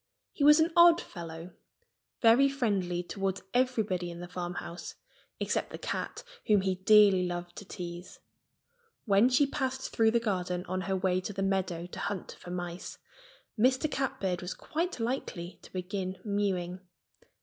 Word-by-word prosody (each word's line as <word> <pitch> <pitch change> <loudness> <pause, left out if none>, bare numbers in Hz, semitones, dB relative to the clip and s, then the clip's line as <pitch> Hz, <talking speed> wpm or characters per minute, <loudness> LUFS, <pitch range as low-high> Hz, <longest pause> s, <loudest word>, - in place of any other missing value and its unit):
He 285 - -2
was 300 +2 +8
an 320 +1 +2
odd 340 0 +8
fellow, 165 - -8 0.7
very 240 +5 +6
friendly 195 -10 -1
toward 195 +1 -3
everybody 220 -8 +1
in 170 0 -8
the 175 - -7
farmhouse, 175 -1 -6 0.4
except - - -1
the - - -7
cat, - - -4 0.2
whom 210 -2 +5
he 190 0 +1
dearly 190 -1 +5
loved 175 0 -5
to 205 - -8
tease. 175 -2 -7 0.9
When 205 +3 +5
she 260 +3 +4
passed 265 -1 -3
through 225 -1 +4
the 235 +1 +3
garden 180 -5 -2
on 185 +1 -2
her 190 - +2
way 185 -1 +1
to 205 - -5
the 195 0 -2
meadow 185 -3 -1
to 175 - -9
hunt 200 -3 -4
for - - -10
mice, 175 0 -5 0.6
Mr. 260 +6 +3
Catbird 195 -9 -1
was 180 +1 -5
quite 335 -1 -3
likely 225 -7 -3
to - - -15
begin 185 0 -4
mewing. 190 -3 -1
190 Hz, 155 wpm, -30 LUFS, 180-235 Hz, 0.9 s, was